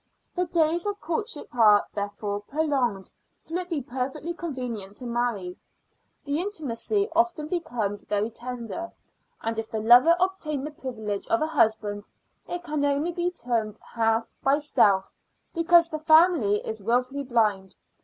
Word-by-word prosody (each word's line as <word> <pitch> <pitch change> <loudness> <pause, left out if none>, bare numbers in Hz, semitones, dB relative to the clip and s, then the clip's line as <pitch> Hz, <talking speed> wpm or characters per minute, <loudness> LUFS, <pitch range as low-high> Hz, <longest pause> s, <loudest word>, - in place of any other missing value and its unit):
The 360 -1 0
days 335 +2 +1
of 410 0 -2
courtship 335 - -4
are, 210 -4 +6
therefore, 205 0 -3
prolonged 260 -6 -1 0.3
till 330 +3 -3
it 360 -1 -5
be 305 -6 -2
perfectly 265 +6 -4
convenient 250 - -5
to 255 - -6
marry: 235 -7 -2 0.7
the 285 +1 -1
intimacy 390 - -1
often 340 -3 +1
becomes 235 - -2
very 210 +2 -1
tender; 245 +7 -6 0.5
and 225 0 -2
if 225 - -5
the 220 - -2
lover 245 +9 +7
obtain 350 -7 -1
the 300 - -5
privilege 220 -8 -5
of 340 -2 +2
a - - +2
husband, 215 -8 0 0.4
it 350 0 -4
can 300 -2 -2
only 285 +4 +1
be 345 +1 -1
termed 230 - -2 0.2
half 225 0 +1
by 275 +1 +4
stealth, 200 -10 +3 0.5
because 335 0 +5
the 310 -2 -5
family 315 - +4
is 220 -1 -5
wilfully 250 +6 0
blind. 210 -7 0
260 Hz, 145 wpm, -26 LUFS, 220-330 Hz, 0.7 s, lover